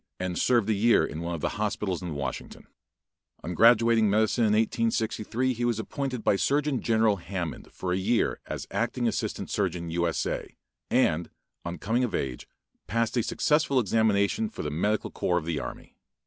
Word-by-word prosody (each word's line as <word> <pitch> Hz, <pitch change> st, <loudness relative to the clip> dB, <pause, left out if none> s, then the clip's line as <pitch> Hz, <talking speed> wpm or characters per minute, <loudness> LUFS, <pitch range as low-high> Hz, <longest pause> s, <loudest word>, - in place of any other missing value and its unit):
and 90 Hz, -1 st, -2 dB
served 120 Hz, -5 st, +3 dB
a 110 Hz, -, +3 dB
year 110 Hz, +3 st, +4 dB
in 80 Hz, -, -6 dB
one 85 Hz, 0 st, -3 dB
of 80 Hz, -, -7 dB
the -, -, -2 dB
hospitals 105 Hz, -4 st, -1 dB
in 85 Hz, -4 st, -5 dB
Washington. 70 Hz, -2 st, -5 dB, 0.8 s
On 90 Hz, -, -4 dB
graduating 115 Hz, +2 st, +5 dB
in -, -, +3 dB
medicine 110 Hz, +3 st, +2 dB
in 105 Hz, -, +3 dB
1863, 115 Hz, +2 st, 0 dB
he 120 Hz, 0 st, -4 dB
was 120 Hz, -2 st, +1 dB
appointed 125 Hz, +1 st, -4 dB
by 100 Hz, -, +3 dB
Surgeon 145 Hz, +2 st, +1 dB
General 110 Hz, -2 st, +2 dB
Hammond 85 Hz, -2 st, -5 dB
for 90 Hz, -1 st, -3 dB
a -, -, +1 dB
year 110 Hz, +5 st, +1 dB
as -, -, -5 dB
acting -, -, 0 dB
assistant -, -, -3 dB
surgeon 90 Hz, -4 st, -1 dB
U. 85 Hz, +1 st, +1 dB
S. 85 Hz, -, -1 dB
A. -, -, -4 dB, 0.3 s
and, 80 Hz, +2 st, +2 dB, 0.3 s
on 85 Hz, 0 st, -5 dB
coming 115 Hz, +7 st, 0 dB
of 120 Hz, -, -1 dB
age 65 Hz, -2 st, -3 dB, 0.4 s
passed 115 Hz, +5 st, 0 dB
a 120 Hz, -, +3 dB
successful 145 Hz, +3 st, +2 dB
examination 110 Hz, -, +2 dB
for 225 Hz, -, -7 dB
the 75 Hz, -, -3 dB
medical 105 Hz, +7 st, 0 dB
corps 90 Hz, -, 0 dB
of 80 Hz, -, -2 dB
the 80 Hz, -3 st, -1 dB
army. -, -, -8 dB
105 Hz, 185 wpm, -27 LUFS, 90-115 Hz, 0.8 s, graduating